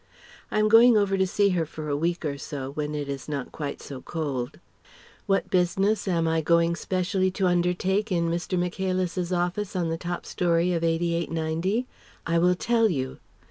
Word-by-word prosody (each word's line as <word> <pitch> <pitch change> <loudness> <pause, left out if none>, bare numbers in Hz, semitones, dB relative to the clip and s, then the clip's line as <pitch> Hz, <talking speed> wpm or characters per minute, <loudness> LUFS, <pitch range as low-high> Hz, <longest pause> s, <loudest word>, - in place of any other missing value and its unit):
(I - - -2
am 215 0 +4
going 225 +1 +7
over 200 -2 +2
to 190 0 +2
see 200 +2 +2
her 180 -3 +1
for 155 0 -7
a 145 - 0
week 170 +3 -1
or 145 -2 -1
so, 140 -3 -5
when 150 +1 -3
it 145 -1 -3
is 140 +1 -5
not 140 -3 -4
quite 145 -2 -5
so 135 -2 -8
cold.) 140 -7 -4 0.7
What 195 0 +1
business 195 +4 +1
am 170 -3 +1
I 160 0 +1
going 170 +1 +3
specially 185 +2 0
to 195 - +1
undertake 180 +4 +1
in 170 -2 +1
Mr. 170 +2 -1
Michaelis's 185 0 -1
office 180 +3 -1
on 175 -3 0
the 165 0 -2
top 175 0 -4
storey 175 0 +1
of 165 -1 -1
88 170 0 0
90? 165 +8 -1 0.4
I 170 0 +2
will 180 +1 +4
tell 230 +3 +2
you. 130 -6 -3
175 Hz, 185 wpm, -26 LUFS, 160-190 Hz, 0.7 s, going